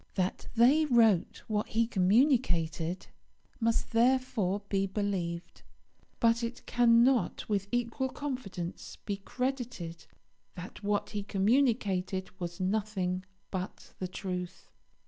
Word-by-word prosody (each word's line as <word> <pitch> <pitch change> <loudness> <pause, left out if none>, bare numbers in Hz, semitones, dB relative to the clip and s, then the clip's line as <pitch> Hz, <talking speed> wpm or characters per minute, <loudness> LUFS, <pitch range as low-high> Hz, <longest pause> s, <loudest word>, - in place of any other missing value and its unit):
That 185 -1 -1
they 265 +7 +5
wrote 225 - +3
what 210 -1 -1
he 230 +1 +2
communicated 185 - +2 0.5
must 230 -1 0
therefore 230 -5 +2
be 195 -1 +1
believed; 190 -4 -3 0.6
but 230 0 +3
it 235 +1 -5
cannot 240 -2 +3
with 200 -2 0
equal 245 +2 -1
confidence 230 -12 -5
be 200 -2 -2
credited 245 -7 -4 0.5
that 180 +3 -9
what 205 0 -1
he 205 -1 -2
communicated 200 -3 +1
was 175 -1 -5
nothing 190 -2 -1 0.3
but 185 -1 -5
the 185 - -2
truth. 180 -1 -6
205 Hz, 105 wpm, -31 LUFS, 185-235 Hz, 0.6 s, they